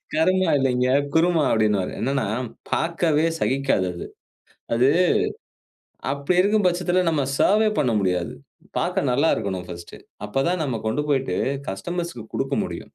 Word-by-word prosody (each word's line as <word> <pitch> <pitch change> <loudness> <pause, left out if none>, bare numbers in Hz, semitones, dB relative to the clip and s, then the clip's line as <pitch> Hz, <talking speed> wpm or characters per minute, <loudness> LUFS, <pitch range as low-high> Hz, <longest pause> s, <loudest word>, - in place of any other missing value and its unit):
"கருமா 185 +4 +2
இல்லைங்க 130 -1 +1 0.2
குருமா" 165 -1 +3
அப்டின்னுவாரு. 105 -4 +1
என்னான்னா 135 -1 0 0.4
பாக்கவே 165 -2 +1
சகிக்காது 135 -8 +1
அது. - - -7 0.7
அது 125 +3 +4 1.2
அப்டி 140 +5 -1
இருக்கும் 205 +1 +2
பச்சத்துல 180 +1 +1
நம்ம 150 -3 0 0.2
சர்வே 215 +2 +4
பண்ண 130 -5 +2
முடியாது. 90 -2 -1 0.5
பாக்க - - 0
நல்லா 140 +6 +2
இருக்கணும் 95 -3 -3
ஃபர்ஸ்ட்டு 85 -1 -9 0.3
அப்பதான் 150 +10 0
நம்ம 130 -5 -2
கொண்டு 145 +7 0
போயிட்டு 135 -1 0 0.3
கஸ்டமர்ஸ்க்கு 170 - -5
குடுக்கமுடியும். - - -2
140 Hz, 120 wpm, -23 LUFS, 115-175 Hz, 1.2 s, அது